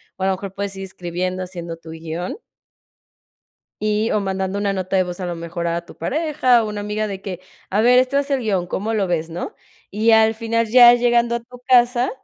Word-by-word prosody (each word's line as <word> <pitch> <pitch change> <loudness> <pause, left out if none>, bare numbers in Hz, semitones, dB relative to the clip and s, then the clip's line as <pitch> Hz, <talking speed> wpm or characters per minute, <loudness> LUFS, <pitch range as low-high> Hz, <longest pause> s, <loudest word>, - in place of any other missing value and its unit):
o 190 - -5
a - - +2
lo 195 - +2
mejor 190 0 -6
puedes 200 0 -4
ir 195 - -5
escribiendo, 185 0 -4
haciendo 170 -2 -7
tu 165 0 -14
guion 165 - -5 1.5
y, 215 +1 +1
o 210 - +1
mandando 190 0 -2
una 200 -1 0
nota 190 0 -2
de 185 - +3
voz 180 +1 -7
a 180 - -3
lo 175 - -3
mejor 170 +1 -5
a 170 0 -2
tu - - -14
pareja, 260 - +2
o 220 - -3
una 210 -1 -4
amiga 210 +1 -2
de 195 -2 -6
que, 185 -3 -6 0.3
a 200 - +2
ver, 245 +2 +5
este 260 +2 +2
es 280 0 -2
el 275 -2 +1
guion, 195 -6 -1
¿cómo 205 +5 -3
lo 210 -3 +1
ves?, 165 -2 -2
¿no? 170 +2 -5 0.4
Y 215 +3 +2
al 220 0 +5
final 230 0 -1
ya 240 +1 +8
llegando 240 -1 +2
a - - -5
tu 245 +1 -15
casa, 245 0 +4
200 Hz, 225 wpm, -20 LUFS, 180-235 Hz, 1.5 s, ya